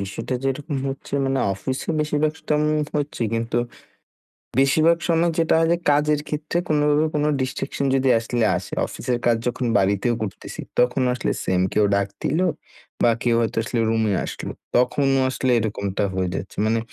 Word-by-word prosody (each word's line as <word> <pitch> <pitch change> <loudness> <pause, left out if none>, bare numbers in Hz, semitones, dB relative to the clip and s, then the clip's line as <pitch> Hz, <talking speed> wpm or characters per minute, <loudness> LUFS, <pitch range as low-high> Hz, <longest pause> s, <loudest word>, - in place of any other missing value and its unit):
বিষয়টা 100 +6 -4
যেরকম 140 +2 -2
হচ্ছে 135 +1 -7
মানে 135 0 0 0.2
অফিসে 130 +7 -4
বেশির 150 -1 0
ভাগ 155 +1 -1
টাম 150 -1 +2 0.4
হচ্ছে 145 -4 -2
কিন্তু, 115 +1 -1 1.0
বেশিরভাগ 155 +5 +4
সময় 170 0 +2
যেটা 165 -1 +3
হয় 165 0 +2 0.2
কাজের 150 +1 +2
ক্ষেত্রে 150 +2 -2
কোনোভাবে 150 0 +3
কোনো 150 0 +1
ডিস্ট্রাকশন 135 +2 -3
যদি 135 0 +2
আসলে 115 0 0
আসে - - -8
অফিসের 125 -1 -3
কাজ 120 -1 +4
যখন 125 +1 -2
বাড়িতেও 100 +5 +1
করতেছি 100 -5 -6 0.2
তখনও 125 +1 +3
আসলে - - -1
সেম, 90 -1 +1
কেউ 105 - +3
ডাক 100 0 +1 0.2
দিলো 170 +6 +1 0.6
বা 120 - +6
কেউ 120 -1 +3
হয়তো 115 - -2
আসলে 120 0 -2
রুমে 110 -2 +1
আসলো - - -6 0.2
তখনও 135 +2 +3
আসলে 130 0 0
এরকমটা 100 -3 -2
হয়ে 95 -1 -1
যাচ্ছে। 95 - -6
মানে 115 +1 +2
130 Hz, 160 wpm, -22 LUFS, 115-150 Hz, 1.0 s, বা